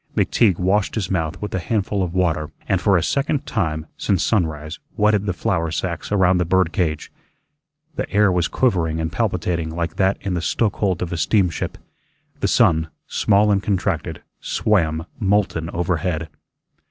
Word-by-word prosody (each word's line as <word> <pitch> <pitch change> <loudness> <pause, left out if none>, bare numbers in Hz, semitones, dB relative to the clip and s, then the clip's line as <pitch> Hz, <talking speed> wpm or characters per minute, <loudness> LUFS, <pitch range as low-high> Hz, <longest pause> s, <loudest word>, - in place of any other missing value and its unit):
McTeague 100 -7 +3
washed 95 +2 +1
his 100 -5 -2
mouth 85 -1 -1
with 105 - -4
a 95 - 0
handful 100 +2 -1
of 90 -1 -2
water 80 -5 +1 0.2
and 95 -2 +1
for 100 -3 +4
a 85 - 0
second 140 0 0
time 80 -7 -2
since 95 -4 +1
sunrise 80 -6 -1 0.2
wetted 105 -1 +2
the - - +2
flour 90 -3 -1
sacks 85 +3 -3
around 95 -3 +3
the - - +3
bird 90 0 +2
cage. 80 -5 -2 0.9
The - - -2
air 105 -1 +4
was 90 -1 +1
quivering 85 -10 +1
and 80 +1 -2
palpitating 85 -4 -1
like 85 +1 -3
that 95 0 +2
in 95 - -2
the 85 - -1
stoke 105 +3 0
hold 95 -4 0
of 85 - -4
a - - -2
steamship. 90 -3 0 0.6
The - - +1
sun, 80 -1 +3 0.2
small 105 +1 +3
and 100 -1 +2
contracted, 95 -4 -2 0.2
swam 80 -6 0
molten 95 -5 +1
overhead. 85 -1 -1
90 Hz, 165 wpm, -21 LUFS, 85-100 Hz, 0.9 s, for